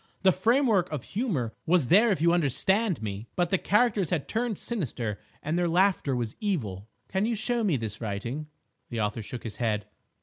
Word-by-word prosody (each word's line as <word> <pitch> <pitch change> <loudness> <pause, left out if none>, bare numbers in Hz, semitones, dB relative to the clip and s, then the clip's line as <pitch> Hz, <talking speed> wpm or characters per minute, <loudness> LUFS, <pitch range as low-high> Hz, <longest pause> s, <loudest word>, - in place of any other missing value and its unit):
The 190 - +7
framework 220 - +2
of 150 -5 -3
humour 175 - -2
was 165 -6 +3
there, 215 +7 +6
if 185 -6 +1
you 170 0 +5
understand 175 - +1
me, 105 +2 -4
but 175 -1 +1
the 190 - +3
characters 210 -4 +2
had 165 -6 -1
turned 225 -2 -1
sinister, 125 - -3 0.2
and 160 +4 0
their 175 -1 +1
laughter 180 -6 +2
was 120 -3 -2
evil." 110 - -2 0.2
"Can 195 +3 0
you 235 - 0
show 235 +2 0
me 180 -10 +2
this 110 -2 -5
writing?" 120 +8 -4 0.4
The 115 - -3
author 105 +1 -1
shook 120 +3 -7
his 110 -2 -6
head. 105 -4 0
170 Hz, 190 wpm, -28 LUFS, -, 0.4 s, The